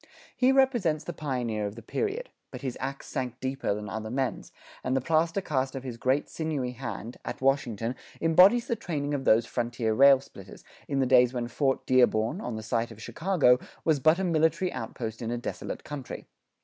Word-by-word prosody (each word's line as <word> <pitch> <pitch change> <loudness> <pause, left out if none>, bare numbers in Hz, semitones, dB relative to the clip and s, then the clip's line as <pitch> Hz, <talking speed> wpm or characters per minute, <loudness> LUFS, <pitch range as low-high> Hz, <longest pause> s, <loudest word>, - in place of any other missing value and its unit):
He 255 +1 +4
represents 240 - +2
the 175 - -5
pioneer 120 -8 -2
of 100 - -7
the 115 - -10
period; 445 - -3 0.2
but - - -9
his 130 -3 -3
ax 135 +1 -4
sank 125 -1 -4
deeper 130 -5 -1
than 105 0 -6
other 110 0 -5
men's, 130 +1 -2 0.3
and 130 +1 +1
the - - 0
plaster 165 +6 +1
cast 135 -6 -1
of 135 - -5
his 125 -3 -6
great 130 +4 +1
sinewy 150 -6 -3
hand, 120 -2 -6
at - - -5
Washington, 125 -4 0 0.3
embodies 180 +9 +6
the 235 - -1
training 150 -9 -3
of 135 -2 -2
these 115 +1 +5
frontier 120 -2 -1
railsplitters, 135 +2 +3 0.2
in 140 -1 0
the - - +3
days 125 -1 +5
when 120 -1 -2
Fort 135 +2 0
Dearborn, 125 - +3
on 120 - -4
the 110 - -6
site 115 +1 -1
of 115 -2 -12
Chicago, 155 - +2 0.3
was 155 -3 +3
but 155 +5 +4
a 190 - -1
military 165 +1 +1
outpost 115 -2 -5
in 115 - -3
a 120 - -1
desolate 120 - -5
country. 145 -4 -7
130 Hz, 190 wpm, -28 LUFS, 120-155 Hz, 0.3 s, embodies